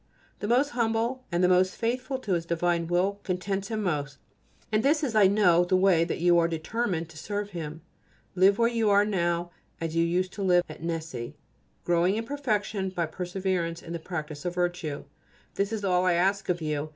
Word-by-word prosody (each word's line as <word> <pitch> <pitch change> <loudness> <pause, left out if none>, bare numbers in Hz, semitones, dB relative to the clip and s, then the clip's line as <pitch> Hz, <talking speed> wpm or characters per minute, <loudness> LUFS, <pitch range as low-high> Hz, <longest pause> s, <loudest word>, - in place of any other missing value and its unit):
The 205 - -3
most 255 +5 +3
humble 235 +1 -1
and 170 +1 +1
the - - +6
most 185 +1 +3
faithful 255 +3 -2
to 215 -7 -2
His 170 -1 -1
divine 170 0 0
will 185 +4 +1
contents 195 +1 -2
Him 215 -1 -3
most, 145 -6 -2 0.5
and 215 0 +2
this 300 +5 +2
is, 255 -6 -1
I 210 -3 +6
know, 185 -4 +4
the 180 +1 +1
way 185 -3 +4
in 170 - +1
which - - -3
you 175 0 +5
are 165 - +3
determined 170 +1 -2
to 160 -1 -11
serve 205 +3 -4
Him. 160 -2 -6 0.5
Live 190 +2 +4
where 230 0 +4
you 230 -2 0 0.2
now 175 -4 +1
are 175 - -10 0.3
as 165 0 -3
you 165 - +3
used 180 +2 0
to 200 - -6
live 180 -2 +4
at - - -10
Nessy, 160 -8 -4 0.5
growing 175 +3 +2
in 225 - -2
perfection 215 -8 -1
by 175 -2 -1
perseverance 180 0 -3
in 170 - -7
the 170 - -3
practice 155 -3 -6
of 175 -1 -3
virtue. 175 -4 -2 0.5
This 200 +1 -1
is 215 -2 -3
all 180 -1 +2
I 180 - +4
ask 195 +3 +1
of 175 -2 0
you. 150 0 -2
180 Hz, 205 wpm, -27 LUFS, 170-205 Hz, 0.5 s, the